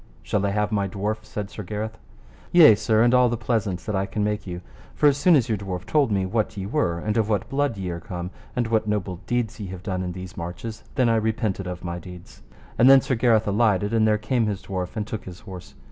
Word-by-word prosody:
Shall 95 +12 -1
I - - +1
have 105 +1 0
my 100 -2 +1
dwarf? 105 +3 -3
said 105 -6 -6
Sir - - -7
Gareth. 105 +3 -5 0.5
Yea, 165 -9 +9
sir, 110 +1 +2
and 120 +1 +4
all 125 -1 +5
the 120 - -1
pleasaunce 110 -5 -1
that 105 - -2
I 95 0 0
can 105 +1 -2
make 105 0 -2
you, 90 -1 -5 0.3
for - - +1
as 145 -2 +6
soon 160 +4 +5
as 130 -6 +3
your 110 -3 -1
dwarf 95 -2 -5
told 145 -6 +2
me 95 -2 +1
what 110 +2 -1
ye 95 - -3
were 100 - 0
and 105 +5 -2
of 110 -1 +1
what 105 -3 0
blood 140 -4 0
ye 95 -2 -3
are 85 - -4
come, 90 +1 -6 0.2
and 125 - +1
what 110 -1 0
noble 100 -4 -2
deeds 120 -3 -1
ye 100 - -5
have 95 0 -8
done 95 -3 -2
in 90 -1 -3
these 90 0 -8
marches, 90 +6 -6
then 130 -3 +3
I 115 -1 +3
repented 110 -3 -1
of 90 0 -6
my 85 0 -4
deeds. 90 0 -12 0.4
And 125 - +7
then 135 0 +8
Sir 135 0 -1
Gareth 115 -3 +3
alighted, 105 -1 +2
and 110 -1 +3
there 105 0 +3
came 115 +1 0
his 100 -2 -3
dwarf 95 0 -4
and 105 -2 -2
took 110 0 -6
his 90 -1 -10
horse. 95 -2 -10
105 Hz, 255 wpm, -24 LUFS, 95-115 Hz, 0.5 s, Yea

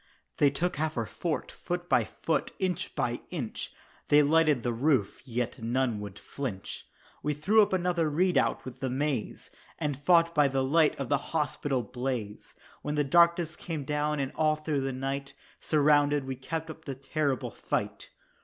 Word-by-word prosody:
They 145 - +5
took 170 +4 -2
half 155 -1 -1
our 115 - 0
fort 165 +7 -3
foot 175 0 -4
by - - +3
foot - - -1
inch 185 -4 -2
by 120 0 -1
inch 135 -11 -5 0.4
They 150 0 +6
lighted 150 -4 +3
the 120 - 0
roof, 125 -4 +1
and - - -22
yet 125 0 -3
none 120 -1 0
would 105 -1 -7
flinch; 115 -9 -6 0.3
We 150 0 -1
threw 200 +10 +4
up 205 - +2
another 175 -3 +1
redoubt 180 +5 +2
with 130 0 -8
the 130 - -2
maize, 135 -2 -2 0.3
And 150 -3 -1
fought 170 +2 +4
by 150 -3 +5
the 135 -1 0
light 150 +3 +3
of 135 - -3
the 145 -1 +3 0.2
hospital 140 -3 -1
blaze 120 -3 -4 0.3
When 150 0 -2
the 150 - +2
darkness 170 +2 +4
came 160 -4 -5
down 150 +1 -1
and 135 -1 -1
all 155 -1 +2
through 155 -2 -2
the 135 0 -1
night 135 +1 -4 0.2
Surrounded, 145 -2 +3
we 130 0 -3
kept 160 +5 -4
up 160 0 -13
the 135 - -4
terrible 135 -1 -1
fight. - - -3
145 Hz, 175 wpm, -29 LUFS, 130-160 Hz, 0.4 s, They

